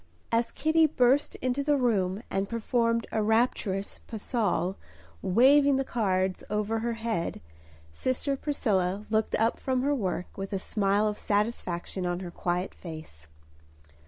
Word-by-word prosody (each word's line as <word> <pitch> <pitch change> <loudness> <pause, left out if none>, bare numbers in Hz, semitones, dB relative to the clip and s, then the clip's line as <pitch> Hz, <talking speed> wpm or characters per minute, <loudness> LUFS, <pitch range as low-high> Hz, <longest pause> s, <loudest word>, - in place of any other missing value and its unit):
As 230 0 +1
Kitty 315 0 +3
burst 270 0 +2
into 255 +2 0
the 290 0 +3
room 205 -5 +1
and 195 0 -1
performed 230 0 +1
a 220 - 0
rapturous 215 -3 0
pas 220 - -6
seul, 200 -5 0 0.5
waving 275 +7 +5
the 270 - +1
cards 190 -7 0
over 210 +2 0
her 235 +1 -1
head, 225 -7 -2 0.5
sister 260 - -1
Priscilla 205 -9 0
looked 220 0 +1
up 225 +1 +1
from 260 -1 0
her 285 +1 +2
work 185 -8 -3
with 195 +1 -4
a - - +1
smile 200 +2 +1
of 210 0 -3
satisfaction 200 -4 -1
on 175 +1 -2
her 175 -2 -6
quiet 180 +2 -2
face. 155 - -10
220 Hz, 145 wpm, -28 LUFS, 190-245 Hz, 0.5 s, waving